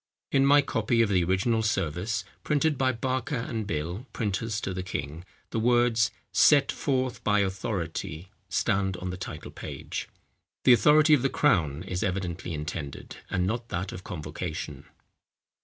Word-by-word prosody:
In 135 0 +4
my 145 +1 +6
copy 115 -2 +2
of 110 - 0
the 95 -3 +3
original 100 +6 +1
service 110 +2 -1 0.2
printed 150 +1 +2
by 130 0 +2
Barker 130 +4 -2
and 115 -3 -3
Bill, 85 - -3
printers 105 +1 -1
to 95 - -3
the 95 - -3
king, 75 -2 -5 0.3
the 115 - 0
words 120 0 +3 0.2
"Set 140 -2 +5
forth 130 -4 -1
by 105 -1 +3
authority," 95 -3 -3 0.2
stand 95 -1 +1
on 90 0 -4
the - - -4
title - - -7
page. - - -6 0.5
The 125 - +8
authority 150 +5 +6
of 145 - +5
the 135 - +2
crown 85 - +2
is 95 -1 -3
evidently 90 -2 -2
intended, 75 -2 -5
and 90 -1 0
not 115 +4 -2
that 90 +3 -3
of 90 - -8
convocation. 80 0 -5
105 Hz, 155 wpm, -27 LUFS, 90-120 Hz, 0.5 s, The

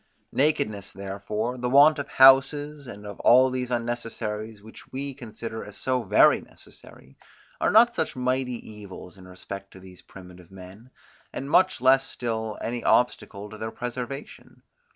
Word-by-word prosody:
Nakedness 140 -9 0
therefore, 100 +5 -5
the 125 0 -2
want 145 +3 +6
of 140 - -4
houses, 140 +1 +4
and 105 -3 -10
of 100 -1 -9
all 130 +2 +5
these 125 -1 -3
unnecessaries, 115 -3 -4
which 110 - -14
we 140 +1 -4
consider 115 -2 -8
as 105 - -11
so 130 -1 -1
very - - +4
necessary, 65 +1 -15 0.4
are - - +1
not 235 +3 +5
such 160 - -3
mighty 125 -1 -1
evils 100 -3 -11
in 95 -1 -15
respect 100 +2 -9
to 95 - -13
these 90 -1 -14
primitive 90 -2 -14
men, 95 +5 -13 0.4
and 135 - -6
much 185 -7 +3
less 130 +1 +5
still 110 -4 -4
any 120 0 -4
obstacle 105 -4 0
to 110 - -10
their 110 - -4
preservation. 125 +3 -8
120 Hz, 150 wpm, -25 LUFS, 105-130 Hz, 0.4 s, want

